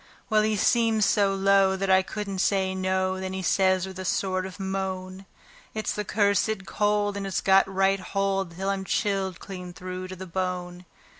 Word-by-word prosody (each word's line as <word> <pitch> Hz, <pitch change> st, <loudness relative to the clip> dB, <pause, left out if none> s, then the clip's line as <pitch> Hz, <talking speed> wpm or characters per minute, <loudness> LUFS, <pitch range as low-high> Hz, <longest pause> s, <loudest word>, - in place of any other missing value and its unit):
Well, 215 Hz, 0 st, +5 dB
he 215 Hz, 0 st, +1 dB
seemed 225 Hz, 0 st, +3 dB
so 200 Hz, -1 st, +3 dB
low 195 Hz, 0 st, +4 dB
that 190 Hz, 0 st, 0 dB
I 190 Hz, 0 st, +6 dB
couldn't 200 Hz, 0 st, -5 dB
say 190 Hz, -1 st, +1 dB
no; 185 Hz, 0 st, 0 dB
then 190 Hz, 0 st, -4 dB
he 190 Hz, 0 st, -4 dB
says 190 Hz, +1 st, +2 dB
with 190 Hz, -1 st, -8 dB
a -, -, -4 dB
sort 185 Hz, 0 st, -1 dB
of 190 Hz, -, -11 dB
moan: 190 Hz, 0 st, -4 dB, 0.5 s
"It's 215 Hz, -, -2 dB
the 210 Hz, -, -3 dB
cursed 205 Hz, 0 st, +1 dB
cold, 205 Hz, +1 st, 0 dB
and 200 Hz, -1 st, -3 dB
it's 190 Hz, -, -1 dB
got 195 Hz, 0 st, +4 dB
right 195 Hz, 0 st, +2 dB
hold 195 Hz, -2 st, -1 dB
till 195 Hz, +1 st, -1 dB
I'm 195 Hz, -1 st, -2 dB
chilled 195 Hz, -2 st, -1 dB
clean 180 Hz, -2 st, -8 dB
through 185 Hz, +1 st, -6 dB
to 185 Hz, -, -7 dB
the 190 Hz, +1 st, -8 dB
bone. 180 Hz, 0 st, -4 dB
190 Hz, 190 wpm, -26 LUFS, 185-200 Hz, 0.5 s, I